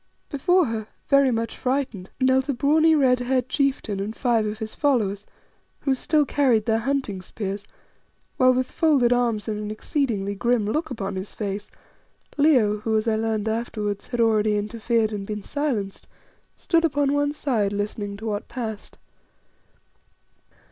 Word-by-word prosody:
Before 355 +5 +3
her, 220 -2 -4 0.2
very 275 -1 +5
much 230 -1 -2
frightened, 255 -8 -2
knelt 260 +1 +2
a - - +2
brawny, 315 +5 +4
red 255 -4 +3
haired 250 0 0
chieftain 275 -9 0
and 210 +3 -4
five 230 -4 +1
of 210 0 -4
his 220 -1 -6
followers, 210 -9 0 0.5
who 275 - +1
still 295 +3 +2
carried 255 -7 +2
their 225 -1 +2
hunting 240 -6 -2
spears, 200 +2 -5 0.7
while 255 -1 +6
with 255 0 -1
folded 280 -7 +3
arms 235 -4 0
and 210 -1 -2
an 210 0 -4
exceedingly 215 -3 -1
grim 235 +1 +1
look 310 +9 -1
upon 200 -6 -4
his 190 +2 -6
face, 205 0 -4 0.7
Leo, 255 -9 +4
who, 220 +1 0
as 215 +2 -1
I 220 - +2
learned 220 -1 -1
afterwards, 215 -2 -3
had 240 -1 -4
already 215 -2 +3
interfered 220 +1 0
and 205 -1 -3
been 210 -1 -4
silenced, 245 -10 -3 0.5
stood 335 -1 +1
upon 285 -3 +1
one 290 0 +1
side 240 -9 0
listening 205 0 -3
to 220 - -9
what 210 -2 -3
passed. 220 -5 -6
230 Hz, 155 wpm, -24 LUFS, 210-275 Hz, 0.7 s, while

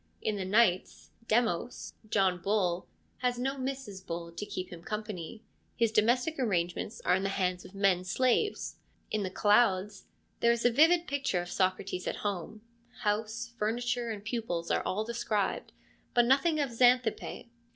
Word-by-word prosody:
In 215 - -1
the 195 -2 -3
Knights, 190 -2 +2
' 230 - -28
Demos 235 -1 -1
' - - -40
— 215 - -22
John 185 -4 +2
Bull 185 -3 0 0.2
— - - -39
has 245 -1 0
no 265 +3 -1
Mrs. 260 -8 -5
Bull 170 -1 -5
to 205 +5 -6
keep 185 -1 -5
him 170 - -9
company: 210 0 -5 0.3
his 230 -2 +2
domestic 245 +8 +2
arrangements 185 -4 -1
are 180 - +4
in 190 - +2
the 195 - -1
hands 185 -2 -1
of 195 - -13
men 195 -2 +3
slaves. 255 - 0 0.3
In 215 - 0
the 190 - -2
Clouds 205 -1 +2 0.3
there 235 - +4
is 235 0 -1
a 245 - +6
vivid 330 +7 +5
picture 260 - -1
of 175 - -9
Socrates 185 -1 -1
at - - -1
home: 205 +2 -3 0.4
house, 220 +2 -1
furniture, 240 +2 -1
and 210 -2 -6
pupils 210 -8 -2
are - - +2
all 210 +3 -1
described, 220 -3 -2 0.4
but 240 -1 +6
nothing 280 +5 +3
of 280 -4 0
Xanthippe. 245 -1 +2
215 Hz, 170 wpm, -30 LUFS, 185-245 Hz, 0.4 s, a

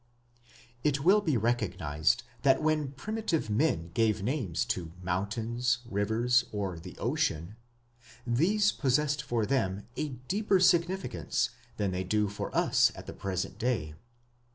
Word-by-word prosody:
It 140 -2 +1
will 200 +5 +6
be 155 -10 +1
recognized 105 -4 0 0.2
that 135 -2 +4
when 155 -3 0
primitive 175 - -2
men 105 - +1
gave 110 -3 +2
names 115 - -1
to 85 -3 -3
mountains, 110 +7 0
rivers, 115 +3 +2
or 95 -5 -3
the - - -10
ocean, 85 +7 -1 0.7
these 190 - +3
possessed 145 +2 +1
for 120 -6 -1
them 105 -6 -1
a 155 - -2 0.2
deeper 200 +1 +2
significance 175 - +1 0.3
than 100 -2 0
they 90 0 -2
do 105 +2 +1
for 100 - -4
us - - +4
at - - -9
the - - -7
present 95 -2 -4
day. 110 -11 -1
120 Hz, 130 wpm, -30 LUFS, 100-150 Hz, 0.7 s, will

